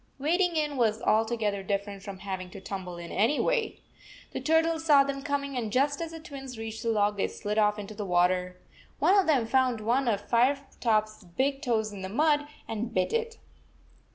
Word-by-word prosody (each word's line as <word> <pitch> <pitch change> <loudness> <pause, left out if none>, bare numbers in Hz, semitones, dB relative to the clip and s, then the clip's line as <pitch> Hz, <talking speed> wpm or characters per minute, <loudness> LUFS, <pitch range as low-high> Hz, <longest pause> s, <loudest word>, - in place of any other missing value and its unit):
Wading 345 +5 +1
in 300 -3 0
was 220 -3 +2
altogether 220 -2 +1
different 200 0 -3
from 195 -1 -7
having 190 -2 -5
to 195 - -10
tumble 190 -2 -6
in, 170 0 -8
anyway. 425 - +1 0.5
The - - -4
turtles 320 0 +2
saw 290 -4 +6
them 275 0 -4
coming, 280 -1 -2
and 225 -4 -2
just 285 +5 +1
as 330 - -3
the 325 0 -8
Twins 270 -6 -9
reached 225 0 -6
the 230 - -1
log, 210 -2 +2
they - - +1
slid 210 +1 -3
off 210 0 +3
into 210 0 -7
the 210 0 -5
water. 180 0 +1 0.4
One 385 - +4
of 390 -3 +4
them 270 -7 +3
found 255 -1 +2
one 240 +5 +1
of 205 -3 0
Fire 255 +4 +3 0.2
top 215 -3 +3
s 215 0 -15
big 270 +10 -1
toes 220 -6 0
in 195 - -7
the 190 - -5
mud, 295 +5 +2 0.2
and 225 +1 -3
bit 185 -4 0
it. 460 0 -1
230 Hz, 200 wpm, -28 LUFS, 205-285 Hz, 0.5 s, saw